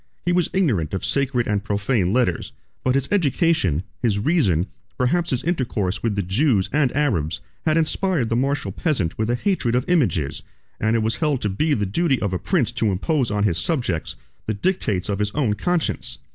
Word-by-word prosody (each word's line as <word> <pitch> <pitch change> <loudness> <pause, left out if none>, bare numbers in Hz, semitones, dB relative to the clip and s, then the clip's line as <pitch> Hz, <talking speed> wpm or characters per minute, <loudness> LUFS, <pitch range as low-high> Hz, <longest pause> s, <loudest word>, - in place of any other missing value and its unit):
He 175 - +2
was 175 -1 +2
ignorant 110 - +1
of 95 - -3
sacred 135 -3 +1
and 105 -2 -1
profane 100 -2 0
letters; 115 -7 0 0.3
but 130 0 +2
his 135 0 +1
education, 155 - +2 0.2
his 110 -5 +1
reason, 100 - +2 0.3
perhaps 170 +8 +1
his 130 0 -1
intercourse 120 - -1
with 115 -3 0
the 100 - 0
Jews 100 - +1
and 140 -4 +3
Arabs, 85 - 0 0.3
had 155 +1 +3
inspired 165 - +1
the 115 - +1
martial 135 -4 0
peasant 100 - -1
with 110 +1 0
a 120 - +2
hatred 125 - 0
of 125 - +1
images; 120 - +1 0.4
and 110 +1 +1
it 115 - +1
was 110 +1 -1
held 150 -4 +1
to 105 - +1
be 150 +10 +1
the 105 - 0
duty 135 - +1
of 100 -3 -2
a 90 - -1
prince 140 - +1
to 115 -3 0
impose 130 - 0
on 105 0 0
his 85 -5 +2
subjects 105 - -1 0.3
the 110 - -1
dictates 105 - 0
of 100 -1 -2
his 105 0 +1
own 130 -8 +1
conscience. 155 - -1
120 Hz, 195 wpm, -22 LUFS, 100-150 Hz, 0.4 s, and